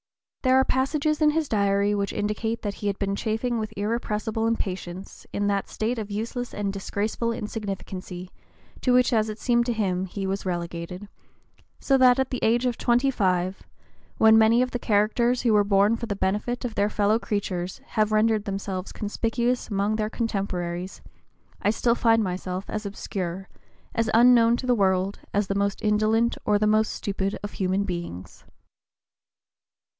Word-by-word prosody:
There 260 -1 +3
are 265 - +3
passages 300 +4 0
in 305 - +6
his 310 0 0
Diary 200 -1 +2
which 200 -1 -1
indicate 215 +2 -2
that 205 -2 -2
he 205 - -5
had 200 -1 -1
been 195 -1 -1
chafing 225 +3 -1
with 215 -1 -4
irrepressible 220 +1 -1
impatience 190 -4 -4
"in 205 - -1
that 200 -1 0
state 230 +2 -2
of 215 -1 -5
useless 230 +4 -4
and 200 -1 -2
disgraceful 210 +4 -2
insignificancy," 195 -4 -6 0.5
to 250 - +2
which, 250 0 +4
as 220 -1 +2
it 215 - -5
seemed 235 0 +1
to 240 - +1
him, 190 -4 -1
he 195 +2 -5
was 195 +1 -2
relegated, 175 +1 -4 0.7
so 275 - +2
that 250 -1 +6
at 265 -1 0
the 255 - -2
age 235 +3 +2
of 245 -2 -1
twenty 245 +3 +2
five, 185 -4 0 0.6
when 220 0 +6
"many 225 +3 +5
of 255 - -3
the 245 - -2
characters 235 +4 +2
who 230 -3 +3
were 205 -1 +5
born 200 +2 +3
for 235 0 -5
the 205 - -2
benefit 210 +6 -1
of 235 - -3
their 205 0 +1
fellow 210 +1 +2
creatures, 185 -5 -3
have 215 0 +1
rendered 215 0 +2
themselves 195 -2 -4
conspicuous 235 +3 -1
among 205 +1 0
their 215 -1 -1
contemporaries,... 190 -5 -3 0.6
I - - +2
still 230 +2 +2
find 225 -2 +3
myself 185 0 -4
as 215 -1 -4
obscure, 190 -2 -5 0.5
as 230 0 0
unknown 235 0 +6
to 255 - -5
the 250 - +3
world, 190 -2 +1
as 205 0 +1
the 195 - -2
most 200 +1 -1
indolent 215 +2 +2
or 210 -1 +3
the 215 - +1
most 215 +1 +3
stupid 195 0 -2
of 205 - -4
human 190 +1 0
beings." 170 - -6
210 Hz, 170 wpm, -25 LUFS, 195-230 Hz, 0.7 s, in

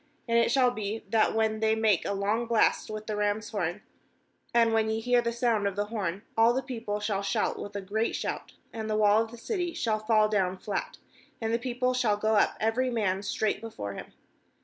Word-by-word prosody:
5And 230 0 +2
it - - +1
shall 250 0 +4
be, 215 -1 -4
that 220 -1 +3
when 220 -1 +1
they 220 0 +2
make 220 -5 +2
a - - -1
long 210 +4 0
blast 230 -1 +2
with 215 0 -6
the 215 - -3
ram's 210 +1 -1
horn, 200 -2 -2 0.7
and 230 -2 +3
when 220 -1 +2
ye 220 0 0
hear 245 +1 +3
the 235 0 -1
sound 230 -3 +1
of 200 - -3
the 205 0 0
horn, 195 -2 -2
all 225 +1 +5
the 265 - -1
people 230 -5 -4
shall 210 -2 -1
shout 200 - -1
with 205 0 -7
a 200 - -2
great 215 +4 -1
shout; - - -4 0.2
and 220 -1 -4
the 215 - +1
wall 210 0 +5
of 225 - -3
the 235 - -11
city 350 - -3
shall 215 -2 0
fall 215 0 +3
down 190 -3 0
flat, 195 +1 -4 0.4
and 225 0 -1
the 230 - +2
people 250 +1 -1
shall 235 -5 +1
go 215 +1 +1
up 210 - +3
every 230 +4 +1
man 200 -5 0
straight 205 +1 -1
before 105 - -6
him. - - -9
220 Hz, 220 wpm, -28 LUFS, 205-230 Hz, 0.7 s, all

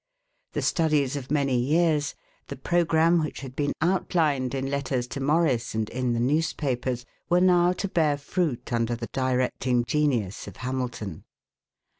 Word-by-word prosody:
The - - -2
studies 150 -5 +1
of 135 -2 -6
many 140 -3 +1
years, 150 +2 +2 0.3
the - - -6
programme 170 -1 +2
which 150 - -5
had 130 -2 -8
been 145 0 0
outlined 160 -7 +1
in 135 0 -2
letters 135 -3 -1
to - - -5
Morris 140 -5 +1
and 110 -1 0
in 125 -1 -1
the 115 - -1
newspapers, 130 -3 0 0.2
were 175 0 +4
now 180 -1 +4
to 200 - -3
bear 155 -6 +1
fruit 145 -4 -2
under 115 0 +1
the 115 0 -6
directing 125 -1 0
genius 120 -9 0
of - - -10
Hamilton. 125 -8 -4
140 Hz, 150 wpm, -26 LUFS, 125-160 Hz, 0.3 s, were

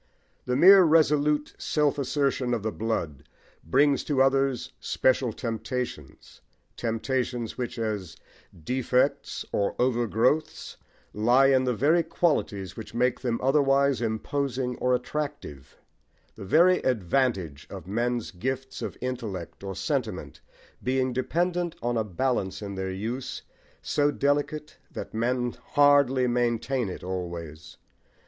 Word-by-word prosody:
The 125 - 0
mere 190 +7 +8
resolute 150 -2 +3
self 150 -1 +1
assertion 130 -2 0
of 110 - -5
the 110 - -1
blood 105 - -3 0.4
brings 140 - +3
to 145 -3 0
others 135 -1 +1
special 130 -2 +1
temptations, 115 - -5 0.3
temptations 120 0 -2
which, 125 -1 -4
as 105 -6 -3 0.5
defects 125 - 0
or 100 - 0
over 120 -1 +1
growths, 125 +9 0 0.4
lie 120 +6 +4
in 130 -1 +3
the 125 -1 0
very 155 +9 +3
qualities 150 - -1
which 110 +1 -9
make 125 +1 +1
them 120 -3 -1
otherwise 140 -1 +3
imposing 125 +3 -2
or 125 0 +2
attractive; 125 - -5 0.6
the - - -9
very 175 - +5
advantage 100 - 0
of 95 -5 -8
men's 120 +4 -1
gifts 130 +7 -4
of - - -5
intellect 110 -9 -5
or 95 -1 -5
sentiment - - -3 0.4
being 130 0 0
dependent 175 +6 -1
on 120 +1 -1
a 110 - +1
balance 105 -1 -2
in 100 -1 -5
their 95 0 -3
use 120 +7 -5 0.4
so 145 0 +2
delicate 145 +1 -1
that - - -7
men 120 +2 -1 0.2
hardly 140 -3 +5
maintain 120 -1 0
it - - -7
always. 85 -4 -6
125 Hz, 125 wpm, -26 LUFS, 110-140 Hz, 0.6 s, mere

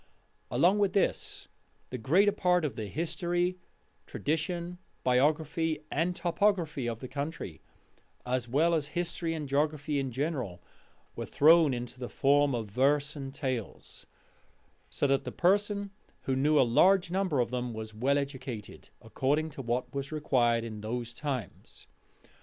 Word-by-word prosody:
Along 190 +4 +3
with 200 -3 +2
this, 200 - -1 0.4
the 125 - -4
greater 180 - +4
part 180 -4 +2
of 135 -7 -3
the 110 -2 -4
history, 175 - -1 0.5
tradition, 170 +3 -2 0.2
biography, 155 +4 +1
and 170 +4 0
topography 170 - 0
of 115 -1 -5
the 130 - -5
country, 140 - -5 0.6
as 125 -1 -1
well 160 +7 +3
as 155 -3 0
history 170 -1 -1
and 150 -2 -4
geography 150 +1 0
in 135 -1 -2
general, 130 - -3 0.6
was - - -5
thrown 160 0 +6
into 125 0 -5
the 125 - -5
form 140 -1 +3
of 115 -2 -2
verse 140 +5 +2
and 135 -2 -6
tales, 130 -6 -5 0.8
so - - -1
that 135 -1 +2
the - - -5
person 200 +2 +1 0.3
who 135 - -1
knew 145 +3 +3
a - - +7
large 175 +9 +4
number 185 -7 +1
of 120 -1 +1
them 125 -1 -2
was 110 -1 -6
well 130 +6 +1
educated, 130 -6 -6
according 140 +8 0
to 140 - -7
what 120 0 -2
was 140 +1 -4
required 120 -6 +2
in 110 -2 -6
those 120 +2 -4
times. 130 - -6
145 Hz, 145 wpm, -30 LUFS, 125-165 Hz, 0.8 s, a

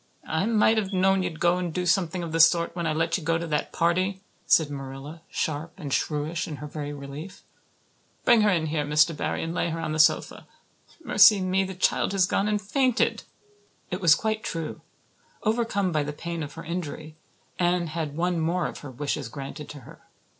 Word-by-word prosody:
"I 160 +6 0
might 220 0 +4
have 200 -2 -3
known 190 0 +3
you'd 175 -4 -4
go 175 +1 +3
and 175 -2 -2
do 180 +2 -2
something 175 0 +1
of 165 - -5
the 165 - -1
sort 170 +1 +5
when 170 -2 -2
I - - +1
let 165 +4 0
you - - -10
go 165 +1 +1
to 170 - -4
that 150 -2 -2
party," 185 +3 0 0.2
said 155 -3 +4
Marilla, 135 +3 -7
sharp 155 +1 -3
and 145 -7 -5
shrewish 155 +2 -1
in 155 - -5
her 150 - -8
very 145 0 -5
relief. 145 +6 -9 0.8
"Bring 235 -2 +6
her 210 - +4
in 170 -5 +1
here, 155 -1 -1
Mr. 150 +2 +3
Barry, - - -2
and 165 0 -3
lay 170 - 0
her 165 0 -3
on 165 -1 -3
the 155 - -2
sofa. 155 - +2 0.6
Mercy 205 -5 +7
me, 185 +1 +1
the 190 0 -6
child 185 - +1
has 190 -2 +4
gone 195 +2 0
and 210 0 +1
fainted!" 250 +4 +1 0.7
It 180 - -3
was 165 -3 +7
quite 220 +3 -2
true. 165 -2 -4 0.6
Overcome 215 -4 0
by 155 -2 +1
the 150 +1 -4
pain 170 +2 -5
of 145 -1 -6
her - - -8
injury, 155 -2 -5 0.4
Anne 175 0 +2
had 155 -2 -4
one 175 0 0
more 170 +2 0
of - - -5
her 145 - -9
wishes 135 0 -3
granted 140 +3 -8
to 145 - -9
her. - - -15
165 Hz, 205 wpm, -26 LUFS, 155-185 Hz, 0.8 s, Mercy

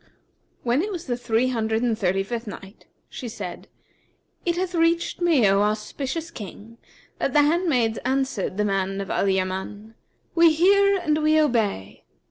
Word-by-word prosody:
When 245 +4 +2
it 415 +4 -3
was 350 -3 -5
the 245 - -1
Three 240 +1 0
Hundred 225 -1 -1
and 235 -2 +1
Thirty 195 -2 0
fifth 230 +2 -5
Night, 195 0 -10 0.2
She 245 - -7
said, 185 -5 -7 0.8
It 345 0 +1
hath 365 0 -2
reached 335 +1 +1
me, 315 -11 +4
O 195 +1 +3
auspicious 265 +10 -2
King, 225 - -10 0.4
that 275 - -1
the 295 - +5
handmaids 290 -8 +1
answered 260 -7 -1
the 210 - +1
man 195 -1 -1
of 195 - -4
Al 200 - +1
Yaman, 190 +3 -3 0.4
"'We 335 -1 +5
hear 395 +4 +4
and 310 -4 0
we 310 +1 +4
obey!' 220 - 0
240 Hz, 160 wpm, -24 LUFS, 205-315 Hz, 0.8 s, the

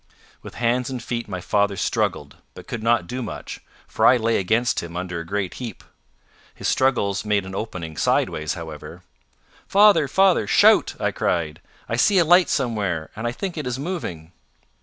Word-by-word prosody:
With - - -11
hands 120 +1 0
and 130 - -4
feet 120 0 -4
my 95 -3 -5
father 100 +1 0
struggled, - - -2 0.2
but - - -11
could 115 - -5
not 115 -4 +2
do 125 +8 -5
much, 115 - -7 0.3
for - - -3
I 125 - +6
lay 115 -1 +1
against 110 +5 +1
him 85 0 -7
under 90 -1 -4
a - - -5
great 100 -1 -2
heap. 115 -5 -7 0.7
His - - -4
struggles 100 -7 +1
made 105 -2 0
an 95 - -8
opening 90 -6 -5
sideways 75 +2 0
however. 80 -4 -9 0.6
"Father! 200 -7 +5
father! 190 - +3
shout," - - +4
I - - 0
cried. 80 -3 -2 0.3
"I 115 - -2
see 200 - +4
a 175 - +5
light 175 +2 +5
somewhere; 100 - -1
and 110 +2 -3
I - - -1
think 175 +5 -5
it 150 - -4
is 125 0 -2
moving." 130 - -5
110 Hz, 180 wpm, -22 LUFS, 90-125 Hz, 0.7 s, I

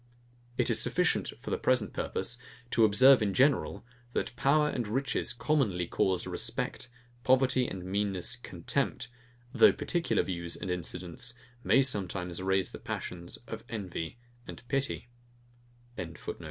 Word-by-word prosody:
It - - +2
is - - +3
sufficient - - +1
for - - -6
the - - 0
present 125 -5 +1
purpose 125 +1 -2 0.3
to 115 - +5
observe 130 +5 +7
in 100 -2 0
general, 135 -1 +2 0.3
that 120 - -2
power 150 +4 +3
and 120 -6 -2
riches 135 +6 0
commonly 120 - +1
cause 90 +1 +1
respect, 130 - -2 0.3
poverty 130 -1 +3
and 90 -2 -6
meanness 95 -1 -1
contempt, - - -2 0.4
though - - +7
particular 170 -1 0
views 85 -2 -3
and 95 - -4
incidents 90 +5 -3 0.3
may 135 - +5
sometimes 95 -7 -2
raise 95 0 +1
the - - -8
passions 85 -1 -6
of 110 -1 -7
envy 95 -4 -4 0.3
and - - -8
of 120 - -28
pity. 135 -2 -1
105 Hz, 135 wpm, -30 LUFS, 90-130 Hz, 0.4 s, observe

